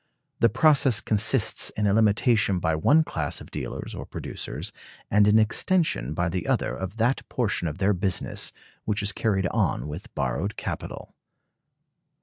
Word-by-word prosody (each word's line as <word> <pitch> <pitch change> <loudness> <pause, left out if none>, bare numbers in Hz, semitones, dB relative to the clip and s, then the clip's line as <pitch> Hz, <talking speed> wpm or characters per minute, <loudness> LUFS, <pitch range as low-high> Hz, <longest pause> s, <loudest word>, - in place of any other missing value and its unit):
The 115 - +5
process 135 -2 +4
consists 110 +2 +2
in 105 - +1
a 100 - +3
limitation 110 -1 +3
by 80 -2 0
one 145 - +4
class 80 - -2
of - - -13
dealers - - -5
or - - -6
producers - - -5 0.4
and 105 0 +5
an 105 +1 +5
extension 110 - +1
by 85 +2 0
the 90 +1 -3
other - - 0
of 95 +3 -6
that 120 +4 +1
portion 105 -8 -1
of 75 - -5
their 100 +1 +2
business 95 0 -2 0.3
which 105 -1 -1
is 100 - 0
carried 100 -2 0
on 65 - 0
with 90 +11 -8
borrowed 70 +9 -2
capital. - - -6
105 Hz, 155 wpm, -25 LUFS, 90-115 Hz, 0.4 s, The